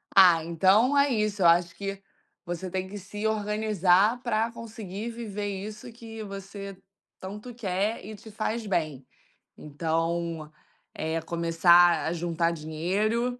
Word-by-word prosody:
Ah, 180 -4 +7
então 190 - +3
é 280 0 +5
isso, 215 -3 0
eu - - +4
acho 170 0 +4
que 195 +1 -5 0.4
você 175 +1 -4
tem 185 +1 -3
que 205 +2 -8
se 205 +2 -6
organizar 210 0 +2
para 230 -1 0
conseguir 220 -2 -7
viver 210 -3 -5
isso 210 +4 -6
que 225 -1 -9
você 195 -1 -8 0.4
tanto 210 +6 -8
quer 210 -1 -2
e 215 +1 -7
te 220 +2 -13
faz 220 +1 -3
bem. 155 -9 -2 0.5
Então, 165 +1 -2 0.4
é 160 +1 -2
começar 170 0 +4
a 160 - 0
juntar 170 0 0
dinheiro. 195 +10 -1
195 Hz, 135 wpm, -27 LUFS, 170-215 Hz, 0.5 s, Ah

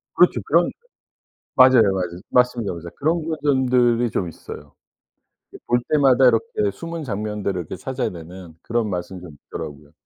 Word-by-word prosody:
그렇죠. - - +4
그런 - - +3 0.8
맞아요 130 -2 +7
맞아요. 90 -2 -3
맞습니다. 125 -5 +1
맞아요. 85 0 -8
그런 160 +2 0
거 160 -1 -2
점들이 125 -4 +2
좀 95 -4 -2
있어요. 75 -2 -11 0.8
이렇게 - - -14
볼 120 0 +3
때마다 135 -3 +4
이렇게 430 - +1
숨은 165 -1 -7
장면들을 105 -5 -3
이렇게 80 - -7
찾아내는 90 -9 -6
그런 115 -2 -1
맛은 90 0 -5
좀 80 -5 -12
있더라고요. 75 0 -8
115 Hz, 365 characters per minute, -22 LUFS, 90-130 Hz, 0.8 s, 맞아요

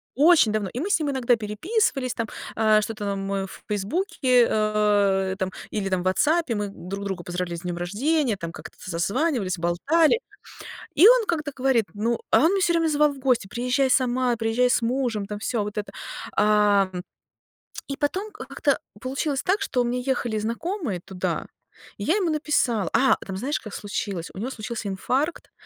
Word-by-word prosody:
очень 300 -4 +5
давно. 210 -3 -1
И 245 - -3
мы 370 +8 -2
с 400 - +3
ним 295 -2 -1
иногда 250 -3 +2
переписывались 255 - -1
там, 230 - -2 0.3
а, 215 -1 +4
что-то 210 -1 -4
нам 195 0 -3
эф 195 -1 -3
в - - -37
"Фейсбуке", 250 - +2
а, 205 -3 +2
там 190 -1 -2 0.2
или 200 -2 -2
там 185 -1 0
в - - -8
"Ватсапе" 290 - +2
мы 205 -1 -2
друг 195 +1 -7
друга 190 -3 -4
поздравляли 175 -1 -3
с - - -14
днём 175 -1 -4
рождения, 230 - 0
там 170 -2 -5
как-то 160 +1 -11
созванивались, 195 - 0
болтали. 295 - +3 0.8
И 360 - +8
он - - +6
как-то 305 -3 -1
говорит, 255 -4 +2
ну 225 +3 -1
а - - +6
он 320 +5 +4
меня 395 - +1
всё 345 -2 +3
время 330 -1 +2
звал 300 -1 +3
в 275 - -12
гости: 255 -6 +1
"Приезжай 250 +5 0
сама, 255 -1 +2
приезжай 225 +3 +2
с 245 - +2
мужем". 235 -3 -1
Там 210 0 -5
всё 220 0 -1
вот 210 +1 -6
это. 210 - -4 0.4
Ам, 205 -3 +3 0.9
и 275 - -4
потом, 370 +9 -1
а, - - -6
как-то - - 0 0.2
получилось 270 +1 -2
так, 395 +3 +1
что 255 -10 0
у - - +2
меня 245 +1 -1
ехали 245 -4 -1
знакомые 235 - -3
туда, 185 -2 -3 0.5
и 200 - -5
я 325 - +2
ему 365 -6 +1
написала 250 - +1
А, 265 0 +5
там 190 -1 -5
знаешь, 275 +8 -1
как 215 - -9
случилось: 200 -4 -4
у - - -8
него 235 +5 -3
случился 230 -3 -5
инфаркт, 265 - -2
230 Hz, 185 wpm, -24 LUFS, 200-280 Hz, 0.9 s, И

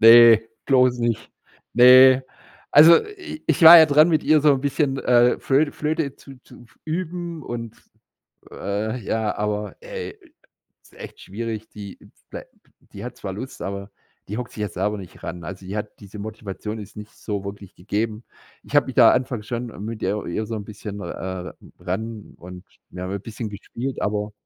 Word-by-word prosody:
Ne, 115 0 +9 0.3
bloß 125 -2 +3
nicht. 115 -2 -2 0.4
Ne. 130 +2 +8 0.5
Also 160 +3 +9
i 375 -7 -10
ich - - +1
war 165 +1 +12
ja 160 - +7
dran, 155 +2 +5
mit 155 -2 +1
ihr 155 -1 +4
so 145 0 +5
'n 135 - -3
bisschen, 140 0 -1
äh, 125 -1 +3
Flöte 145 +2 +1
Flöte 150 -2 -2
zu 135 - -14
zu - - -16
f 120 - -26
üben 170 0 -4
und, 115 -2 -6 0.8
äh, 105 +4 -3
ja 110 0 -1
aber, 105 0 -3
ey, 480 -3 -7 0.7
ist - - -23
echt - - -11
schwierig, 110 +1 -6
die 100 -2 -10 0.3
blei - - -8 0.5
die - - -8
hat - - -8
zwar - - -6
Lust, - - -8
aber 100 +1 -6 0.4
die 105 +4 -5
hockt 125 - -5
sich 105 - -8
ja 105 - -1
selber 105 +4 -2
nicht 95 -3 -13
ran. 85 0 -6
Also, 95 +1 -8
die 95 +2 -6
hat 105 0 -6
diese 100 0 -11
Motivation 105 0 -6
ist 105 -1 -11
nicht 105 0 -9
so 100 -3 -5
wirklich 100 -1 -9
gegeben. 105 +4 -3 0.4
Ich - - -7
hab - - +5
mich - - -6
da - - +7
anfangs 125 -4 -2
schon 120 +1 -3 0.2
mit 115 0 -6
ihr 100 +2 -1
ihr 110 +6 -3
so 115 - -6
'n 105 -2 -6
bisschen, 105 -1 -8
äh, 95 -2 -6 0.3
ran 110 +4 -6
und 90 +1 -11 0.3
wir 90 - -8
haben 95 - -5
'n 100 - -4
bisschen 110 +1 -6
gespielt, 115 +6 -6
aber 105 0 -2
110 Hz, 185 wpm, -22 LUFS, 105-135 Hz, 0.8 s, war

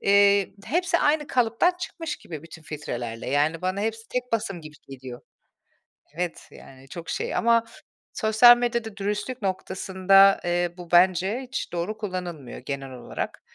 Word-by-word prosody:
eee, 200 0 +4
hepsi 350 +2 +1
aynı 295 0 +2
kalıptan 245 +8 +2
çıkmış 330 -3 -5
gibi 155 -3 -9
bütün 160 -1 -12
filtrelerle. 120 -6 -5
Yani, 150 +4 +1
bana 185 +2 -1
hepsi 225 +1 -3
tek 250 -1 -3
basım 205 -5 -1
gibi 155 -1 -11
geliyor. 130 -2 -9 1.0
Evet, 175 -1 -4
yani, 135 0 -15
çok 165 +3 -8
şey - - -2
ama 230 0 +3 0.5
sosyal 230 +2 +6
medyada 235 -3 -2
dürüstlük 210 +5 -3
noktasında, 190 0 +3
eee, 175 0 0
bu 175 -2 -11
bence 185 +5 +4
hiç 255 -1 -5
doğru 175 +5 -3
kullanılmıyor, 180 - -6
genel 135 0 -6
olarak. 125 -2 -6
190 Hz, 140 wpm, -25 LUFS, 165-225 Hz, 1.0 s, sosyal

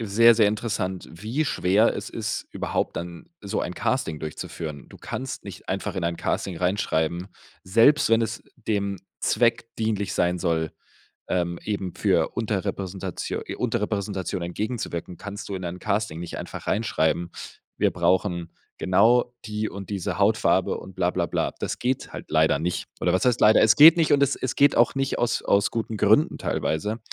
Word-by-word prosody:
sehr, 115 +2 +5
sehr 110 -2 +5
interessant, 105 -4 -2
wie 110 - -2
schwer 105 -4 +3
es - - -5
ist, - - -4
überhaupt - - -2
dann 85 - -7
so 100 - -2
ein - - -4
Casting 75 -2 -1
durchzuführen. 75 -1 -6
Du - - -13
kannst 130 0 -6
nicht - - -10
einfach - - -3
in - - -2
ein 85 0 -1
Casting 95 +1 -2
reinschreiben, 90 -1 0 0.4
selbst 115 +10 +5
wenn 115 0 +4
es 110 0 -4
dem 100 -4 -2 0.2
Zweck 115 -1 +1
dienlich 105 -4 -1
sein 90 +1 +1
soll, 80 -3 0 0.6
ähm, 85 -1 -1
eben 100 -4 -3
für - - +2
Unterrepräsentatio 95 -4 -3
äh, - - -5
Unterrepräsentation 100 -3 -2
entgegenzuwirken 90 -1 -4
kannst 100 0 -7
du 100 - -4
in 95 -1 -5
ein 85 +1 -5
Casting 100 -4 -1
nicht 85 0 -6
einfach - - -7
reinschreiben: 85 -5 0 0.5
„Wir - - +2
brauchen 90 -3 +1 0.3
genau 120 +6 +3
die 110 0 -2
und 100 0 -8
diese 100 -4 -3
Hautfarbe” - - +2
und 95 - -11
bla 90 -1 +2
bla 90 -2 -1
bla. - - -1
Das - - -3
geht 125 +1 -2
halt - - -8
leider 80 -2 +3
nicht. 85 +3 -2
Oder 90 - +2
was 95 - +1
heißt 125 -1 +2
leider? 110 +1 +6
Es 110 0 +5
geht 155 +3 +10
nicht, 165 -3 +2
und 140 -1 +4
es 140 - 0
es 130 - -4
geht 145 - +5
auch 120 +3 +4
nicht 135 0 -1
aus 120 - 0
aus 100 0 +2
guten 115 -1 -3
Gründen - - +3
teilweise. 105 +8 -1
100 Hz, 175 wpm, -25 LUFS, 90-115 Hz, 0.6 s, geht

